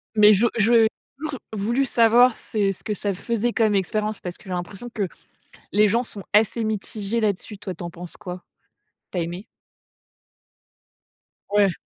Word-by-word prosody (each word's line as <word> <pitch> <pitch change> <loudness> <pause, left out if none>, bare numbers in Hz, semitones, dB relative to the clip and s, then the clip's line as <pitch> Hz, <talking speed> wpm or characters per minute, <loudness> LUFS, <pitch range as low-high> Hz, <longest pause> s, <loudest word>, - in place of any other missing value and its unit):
Mais 210 0 +8
je 210 +4 +3
j'ai 225 +1 +5 0.3
toujours 300 -3 -5
voulu 235 +6 +1
savoir, 240 0 +5
c'est 200 -3 -1
ce 190 - -10
que 215 - -2
ça 200 0 -1
faisait 235 +4 -1
comme 220 -2 +2
expérience, 210 +2 -1
parce 180 -1 -6
que - - -20
j'ai - - -10
l'impression 185 +6 -5
que 200 -3 -1 0.6
les 210 +2 +5
gens 230 +5 +2
sont 205 -4 -7
assez 220 +2 +3
mitigés 215 +1 -2
là-dessus. 210 0 -1
Toi 190 -1 -5
tu 175 - -9
en 170 - -4
penses 175 +1 -9
quoi? 180 -3 -7 0.7
Tu 180 - -2
as - - +1
aimé? 175 +5 -5 2.1
Ouais. 205 -3 +4
210 Hz, 165 wpm, -23 LUFS, 195-230 Hz, 2.1 s, Mais